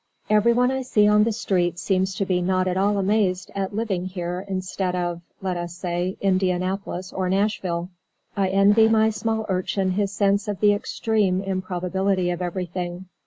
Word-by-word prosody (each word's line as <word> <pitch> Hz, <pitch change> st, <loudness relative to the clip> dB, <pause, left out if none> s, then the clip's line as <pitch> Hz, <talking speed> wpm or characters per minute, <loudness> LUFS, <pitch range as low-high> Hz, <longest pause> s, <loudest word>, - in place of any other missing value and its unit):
Everyone 235 Hz, +4 st, +4 dB
I 265 Hz, 0 st, -1 dB
see 210 Hz, -5 st, +3 dB
on 210 Hz, 0 st, +5 dB
the 230 Hz, -, +1 dB
streets 175 Hz, -4 st, 0 dB
seems 190 Hz, +1 st, 0 dB
to 195 Hz, -, -1 dB
be 180 Hz, -1 st, 0 dB
not 185 Hz, +1 st, +1 dB
at 180 Hz, -, 0 dB
all 200 Hz, +2 st, +2 dB
amazed 190 Hz, -2 st, +1 dB
at 195 Hz, 0 st, -3 dB
living 195 Hz, -5 st, -1 dB
here 180 Hz, 0 st, -4 dB
instead 185 Hz, -1 st, -2 dB
of 175 Hz, -1 st, -2 dB, 0.2 s
(let 185 Hz, -2 st, -1 dB
us 175 Hz, 0 st, -5 dB
say) 180 Hz, +1 st, -2 dB
Indianapolis 185 Hz, 0 st, -1 dB
or 185 Hz, -1 st, -1 dB
Nashville. 185 Hz, -3 st, -1 dB, 0.4 s
I 195 Hz, -1 st, +1 dB
envy 200 Hz, +3 st, +5 dB
my 220 Hz, 0 st, +4 dB
small 220 Hz, 0 st, -2 dB
Urchin 185 Hz, 0 st, 0 dB
his 200 Hz, +1 st, 0 dB
sense 200 Hz, +1 st, +1 dB
of 205 Hz, -2 st, -3 dB
the 205 Hz, -1 st, +5 dB
extreme 205 Hz, -2 st, 0 dB
improbability 185 Hz, 0 st, -1 dB
of 175 Hz, +1 st, -4 dB
everything. 180 Hz, 0 st, -4 dB
190 Hz, 165 wpm, -23 LUFS, 180-205 Hz, 0.4 s, on